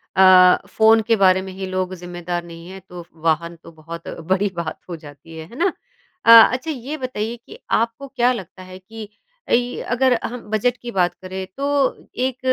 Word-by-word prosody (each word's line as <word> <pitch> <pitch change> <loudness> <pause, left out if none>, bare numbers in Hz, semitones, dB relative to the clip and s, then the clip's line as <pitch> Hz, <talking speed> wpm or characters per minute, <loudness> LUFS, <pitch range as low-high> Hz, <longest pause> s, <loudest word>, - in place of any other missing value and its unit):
अ, 185 -1 +7
phone 220 0 +4
के 230 - +4
बारे 190 -2 +4
में 190 0 -8
ही 190 +1 -6
लोग 185 0 -3
ज़िम्मेदार 175 0 -5
नहीं 170 0 -12
हैं, 190 0 -10
तो 175 -1 -9 0.2
वाहन 165 +1 0
तो - - -13
बहुत 165 +1 -10 0.2
बड़ी 195 +2 +2
बात 170 -2 -5
हो 175 - -4
जाती 155 +1 -13
है, 160 - -8
है - - -13
ना? 365 +3 +1 0.5
अ, - - +8 0.2
अच्छा 260 +6 -3
ये 280 +2 -6
बताइए 240 -4 -4
कि 440 - -13
आपको 230 +5 0
क्या 250 -2 +1
लगता 185 -4 -9
है 185 0 -11
कि 215 +2 -10 0.4
इ 245 +1 +1
अगर 255 +1 +2
हम 245 +1 -5
बजट 220 +3 +1
की 240 - -6
बात 180 -4 +1
करें 190 0 -6
तो 280 +1 -2 0.5
एक 255 0 -1
190 Hz, 190 wpm, -20 LUFS, 175-240 Hz, 0.5 s, अ